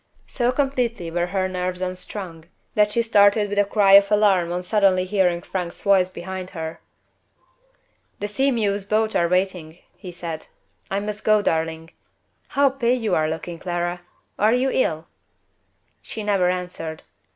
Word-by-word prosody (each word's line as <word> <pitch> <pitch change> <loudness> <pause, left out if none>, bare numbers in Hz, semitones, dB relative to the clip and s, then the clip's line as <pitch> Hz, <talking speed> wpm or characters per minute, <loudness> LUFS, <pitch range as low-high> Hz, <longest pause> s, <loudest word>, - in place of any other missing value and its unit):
So 245 -1 0
completely 250 - -1
were 175 +1 0
her 190 0 -1
nerves 180 0 -3
unstrung, 185 -2 -6 0.3
that 210 0 +3
she 235 +2 +1
started 205 -1 +4
with 205 0 0
a 205 - +4
cry 200 -1 +3
of 200 +1 +7
alarm 195 -5 +3
on 180 +1 -3
suddenly 185 -1 +2
hearing 180 -3 +1
Frank's 180 -2 -5
voice 190 -2 +4
behind 185 0 -7
her. 160 0 -5 1.4
"The 205 - -2
Sea 265 +7 +1
mew's 205 -5 -1
boats 215 +1 +1
are 170 0 +2
waiting," 180 -3 -1 0.2
he 185 -3 -9
said. 170 -2 -6 0.4
"I 195 - -1
must 210 +1 -5
go, 215 -1 +3
darling. 160 -1 -2 0.7
How 280 -1 +5
pale 255 -2 +1
you 220 -5 -1
are 155 -1 +2
looking, 165 +1 -5
Clara! 175 0 -3 0.4
Are 215 +2 +4
you 260 +1 +1
ill?" 160 -9 0 0.9
She 220 - -6
never 195 -3 +2
answered. 180 -3 -4
190 Hz, 155 wpm, -22 LUFS, 175-210 Hz, 1.4 s, of